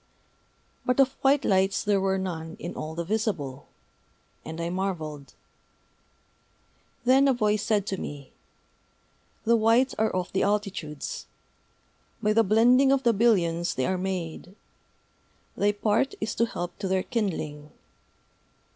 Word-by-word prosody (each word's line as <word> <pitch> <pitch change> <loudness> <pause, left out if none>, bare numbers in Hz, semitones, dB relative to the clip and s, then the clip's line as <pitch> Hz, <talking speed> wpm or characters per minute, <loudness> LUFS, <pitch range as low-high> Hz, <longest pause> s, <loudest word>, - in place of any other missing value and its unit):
But 250 +1 0
of 270 -1 +6
white 275 +1 +3
lights 190 0 +2
there 205 -2 +2
were 190 0 +1
none 165 -4 -4
in 175 - -6
all 155 +1 -6
the 170 - -2
Visible. 170 - -2 0.8
And 160 +1 -7
I 170 0 -2
marvelled. 160 -7 -4 1.7
Then 265 +3 +5
a 270 - +4
Voice 210 -2 +1
said 210 -3 +1
to 195 -2 -3
me: 140 -2 -7 1.1
"The 235 +1 +4
White 230 +4 +3
are 220 0 +3
of 180 -1 -3
the 190 - +1
Altitudes. 195 -8 -2 0.9
By 210 0 +1
the 225 - +5
blending 245 +6 +5
of 275 -1 +2
the 235 -1 +4
billions 180 -6 +2
they 130 - 0
are 185 -1 -1
made. 180 -1 -4 1.0
Thy 205 +1 +2
part 210 +5 0
is 215 +1 -2
to 230 - +1
help 175 -5 -6
to 195 - -2
their 190 0 +1
kindling. 155 -10 -3
195 Hz, 140 wpm, -26 LUFS, 170-225 Hz, 1.7 s, of